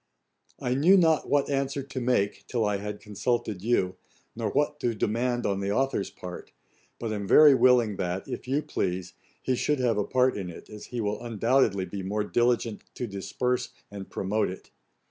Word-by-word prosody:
I 125 - -1
knew 165 +9 +5
not 160 -4 +3
what 145 -1 +2
answer 140 0 -1
to 130 -1 -6
make 120 -5 0
till 115 -3 0
I 105 -1 +1
had 105 +1 -6
consulted 105 -1 -2
you, 95 -4 +1 0.4
nor 110 -2 -2
what 145 +4 0
to 120 -2 -1
demand 120 +4 0
on 100 -1 0
the 100 0 -1
authour's 135 -4 0
part, 90 -1 -9 0.5
but 115 -2 -3
am 100 -2 -4
very 150 +4 +8
willing 120 -5 +4
that, 90 +1 -3
if - - -6
you 140 +4 0
please, 90 - -3 0.3
he 130 - +1
should 150 +4 +1
have 120 -5 +1
a - - +2
part 130 +4 +2
in 95 -3 -4
it, 85 - -11
as 105 -1 -9
he 120 -2 -4
will 105 0 -2
undoubtedly 115 -3 +1
be 95 +2 -6
more 105 +3 -1
diligent 120 0 +1
to 125 - -3
disperse 120 +5 -2 0.2
and 100 -2 -8
promote 105 +3 -1
it. 95 - -10
115 Hz, 185 wpm, -27 LUFS, 100-130 Hz, 0.5 s, very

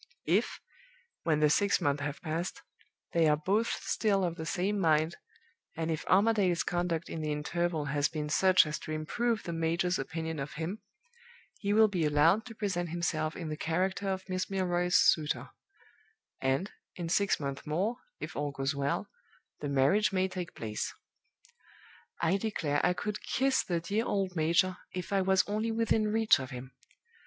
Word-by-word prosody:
If, - - +1 0.7
when 155 -2 +2
the 150 - +5
six 200 +5 +3
months 145 0 0
have 145 +1 -4
passed, 165 +2 -3 0.5
they 165 -2 +4
are 150 0 +4
both 200 +9 +1
still 200 -3 0
of 170 -2 -1
the 160 -1 -6
same 195 +4 0
mind, 160 -1 +2 0.6
and 165 0 -1
if 160 - -3
Armadale's 195 -3 +3
conduct 175 -2 -1
in 160 - -5
the 155 -1 -2
interval 160 +1 -1
has 145 0 +1
been 155 -2 -3
such 185 +4 +5
as 150 0 -3
to - - -7
improve 220 +9 -1
the 170 - -4
major's 165 +2 0
opinion 160 +2 -4
of 140 +2 -5
him, 170 +7 -4 0.8
he 200 - -1
will 220 +1 +6
be 185 -5 -1
allowed 155 +10 +3
to 225 - -9
present 185 -5 -2
himself 155 -2 -1
in 165 -3 -5
the 155 - -3
character 185 +5 -1
of 190 0 -3
Miss 185 -1 -2
Milroy's 180 -2 0
suitor, 155 -2 +3 0.9
and, 135 +9 0 0.2
in 175 -2 -4
six 200 +4 +2
months 140 -1 -5
more, 195 +10 0 0.2
if - - -6
all 145 0 -1
goes 135 +1 -2
well, 140 0 -1 0.5
the 145 - -3
marriage 140 +11 +3
may 190 -1 +1
take 180 -2 -6
place. 110 -2 -3 1.3
"I 170 +3 +2
declare 170 -9 -1
I 180 - +4
could 210 +3 -4
kiss 265 0 +1
the 175 -2 -1
dear 205 +7 -1
old 195 -4 -1
major, 170 +3 +2 0.2
if 180 +2 -4
I 195 - +3
was 190 0 +3
only 215 +2 -1
within 225 -1 +1
reach 225 -3 +4
of 130 -1 -6
him! 125 +1 -8
170 Hz, 170 wpm, -31 LUFS, 155-195 Hz, 1.3 s, will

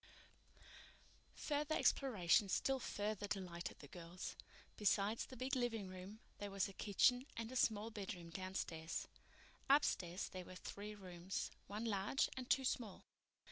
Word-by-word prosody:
Further 300 +1 0
exploration 210 -6 +4
still 265 +8 +2
further 205 -3 -1
delighted 180 -4 -3
the 145 - -11
girls. 175 +3 -6 0.4
Besides 210 +1 +2
the 260 - -9
big 260 +3 0
living 225 -6 0
room, 185 +4 -8 0.2
there 205 - -3
was 195 -1 +1
a 195 - -9
kitchen 245 +7 +4
and 230 +1 -3
a - - -6
small 220 -2 +3
bedroom 185 -5 -5
downstairs. 170 -3 -3 0.6
Upstairs 190 - +3
were 185 0 -6
three 205 +3 -6
rooms, 185 -2 -4 0.2
one 210 +3 -3
large 205 +4 +2
and 255 -1 -5
two 265 -2 +4
small. 225 -6 -1
205 Hz, 135 wpm, -41 LUFS, 185-235 Hz, 0.6 s, exploration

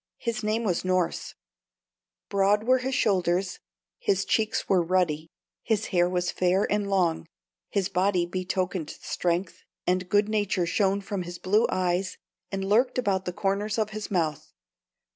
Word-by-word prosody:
His 235 -2 -3
name 215 +2 0
was 180 -6 0
Norss; 185 -2 -1 0.9
broad 200 +1 +2
were 255 +2 +4
his 260 +1 -2
shoulders, 185 -2 +1 0.4
his 195 -1 +1
cheeks 220 +1 0
were 185 -2 +4
ruddy, 165 -3 0 0.3
his 220 -2 0
hair 175 0 +4
was 180 -1 0
fair 185 +2 +2
and 205 -1 0
long, 175 -4 +1 0.4
his 195 -3 0
body 180 -1 +1
betokened 185 -2 -2
strength, 175 +1 -2 0.2
and 180 0 0
good 205 +2 +3
nature 205 -4 0
shone 195 +3 +1
from 200 -1 -3
his 175 0 -6
blue 210 +6 +2
eyes 185 +1 0 0.3
and 195 -1 -2
lurked 240 +6 +3
about 195 -6 0
the 180 - -2
corners 200 +3 -1
of 215 -1 0
his 215 0 -5
mouth. 155 -5 -1
190 Hz, 150 wpm, -27 LUFS, 180-210 Hz, 0.9 s, were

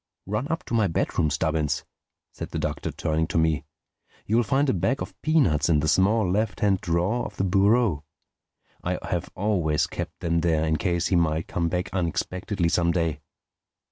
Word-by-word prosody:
"Run 105 +7 -2
up 165 +2 -2
to - - -8
my 110 -3 +3
bedroom, 80 -2 0
Stubbins," 75 0 -1 0.5
said - - -7
the - - -4
Doctor, - - -2
turning 80 0 -1
to 85 - -2
me. 80 -3 +1 0.6
"You'll 115 +3 +3
find 135 +6 +1
a 130 - +2
bag 130 +9 0
of - - -6
peanuts 95 - +2
in 80 -3 +4
the 75 - 0
small 100 +5 +3
left 100 +2 -1
hand 100 -3 +2
drawer 90 +8 0
of - - -7
the - - 0
bureau. 100 -3 +3 0.8
I - - -1
have - - -3
always 90 -7 +1
kept - - -6
them 85 0 +1
there 80 -2 +2
in 80 0 +1
case 85 -1 0
he 95 - +2
might 80 -1 +1
come 85 -1 -1
back 90 +1 -3
unexpectedly 90 +1 -1
some 85 0 +2
day. 80 -3 -1
90 Hz, 180 wpm, -25 LUFS, 80-105 Hz, 0.8 s, in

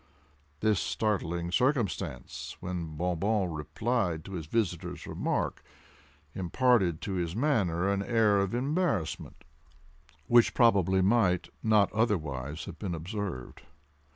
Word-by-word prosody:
This 105 -4 +3
startling 85 -2 -1
circumstance, 125 +2 -1
when 85 -4 -5
Bon 90 0 -1
Bon 100 0 +1
replied 85 +2 -2
to 95 - -9
his 85 -5 -5
visitor's 90 -3 -2
remark, - - -2 0.7
imparted 95 -2 +2
to - - -4
his 85 -1 -2
manner 100 - +1
an 100 0 +1
air 105 -1 +3
of 100 +3 0
embarrassment 135 - -1 0.8
which 120 -1 +4
probably 95 -6 +4
might, 95 -4 +2
not 105 -3 +3
otherwise 80 - -1
have - - -9
been 95 -5 -3
observed. 85 - -5
95 Hz, 115 wpm, -29 LUFS, 85-110 Hz, 0.8 s, which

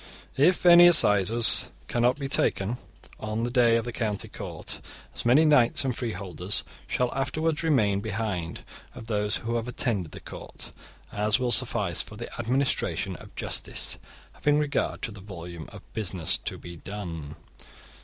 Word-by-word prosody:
(19) 135 +3 +4
If 180 - -2
any 175 0 +9
assizes 115 - +5 0.2
cannot 120 +2 +2
be 140 -2 -3
taken 120 -4 +1 0.4
on 110 +1 -3
the 120 - -1
day 120 -2 +4
of 115 - -2
the 120 - -4
county 110 -3 -2
court, - - -7 0.3
as - - -5
many 135 +7 +6
knights 140 -3 +4
and 130 -3 0
freeholders 100 -5 -3 0.2
shall 125 -1 0
afterwards 155 +4 -1
remain 110 -12 +2
behind, 100 -5 -3 0.3
of 125 -3 -9
those 105 -2 0
who 115 +1 0
have 115 +1 -3
attended 110 -8 -2
the - - -9
court, - - -9 0.4
as 105 +2 +2
will 125 -1 0
suffice - - +1
for - - -9
the - - -8
administration 130 +4 0
of - - -14
justice, - - -3 0.3
having 145 0 +2
regard 150 -1 -1
to 115 - -1
the 100 -1 -10
volume 85 -4 -8
of - - -11
business 95 -6 0
to - - -4
be 85 0 -10
done. 80 -6 -7
115 Hz, 160 wpm, -27 LUFS, 100-130 Hz, 0.4 s, any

